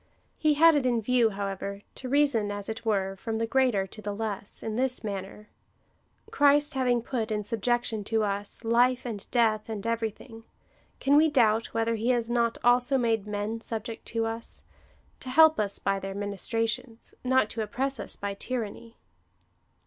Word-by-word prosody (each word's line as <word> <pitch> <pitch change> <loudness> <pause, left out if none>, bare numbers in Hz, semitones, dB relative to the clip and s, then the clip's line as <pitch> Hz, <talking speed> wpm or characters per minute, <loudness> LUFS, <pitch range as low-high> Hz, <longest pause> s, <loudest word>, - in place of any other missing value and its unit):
He 305 -2 +3
had 330 +2 +7
it 290 -3 +2
in 245 -2 +2
view, 235 +1 +3
however, 200 0 -5
to 255 - -8
rea 290 +3 +5
son, 225 -7 0
as 205 -1 -5
it 220 +1 -5
were, 195 -3 0
from 220 +4 -4
the 230 - 0
greater 240 -5 +2
to 215 +3 -11
the 205 -1 -4
less, 210 -2 -5
in 220 -1 -3
this 255 +1 0
manner: 200 0 -6 0.4
" - - -29
Christ 290 +1 +4
having 250 -3 +1
put 235 -3 -2
in 210 -1 -1
subjection 230 0 -1
to 220 0 +1
us 205 +2 -3
life 245 +3 +3
and 215 -5 -5
death, 225 -3 +1
and 215 -1 -5
everything, 225 0 -4 0.6
can 275 +1 +3
we 310 +2 +6
doubt, 230 -5 +3
whether 230 0 +1
he 225 +2 -1
has 240 -2 +1
not 235 -1 +1
also 245 +2 +4
made 225 -4 0
men 210 +2 -3
subject 225 0 -5
to 225 0 -1
us, 225 +1 -5 0.6
to 260 - -8
help 315 +2 +6
us 200 -2 0
by 195 0 0
their 195 0 -6
ministrations 225 +4 -3
— - - -40
not 260 -5 +4
to 225 - -3
oppress 265 +6 -2
us - - -3
by 200 0 -4
tyranny." 230 +1 -5
225 Hz, 180 wpm, -28 LUFS, 210-250 Hz, 0.6 s, had